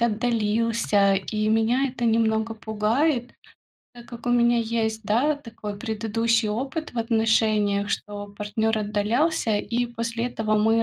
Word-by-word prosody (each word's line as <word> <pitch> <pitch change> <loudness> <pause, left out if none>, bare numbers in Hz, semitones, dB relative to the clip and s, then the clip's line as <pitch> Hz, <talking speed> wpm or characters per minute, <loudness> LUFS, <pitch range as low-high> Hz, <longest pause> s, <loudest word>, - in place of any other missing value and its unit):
отдалился, 225 -3 +1
и 215 +2 -1
меня 225 +5 +2
это 245 -1 -4
немного 225 0 +1
пугает. 235 +5 0 0.6
Так 240 0 -13
как 235 -1 -10
у 245 - +2
меня 240 0 +4
есть, 225 -1 -1
да, 255 +8 +2
такой 225 -6 -8
предыдущий 225 0 0
опыт 265 +8 -3
в 245 - -5
отношениях, 220 -3 +1
что 205 0 -4
партнер 220 +1 -1
отдалялся, 215 +4 0
и 240 +4 -1
после 230 0 -3
этого 220 -3 -1
мы 225 +2 +3
225 Hz, 135 wpm, -24 LUFS, 215-235 Hz, 0.6 s, меня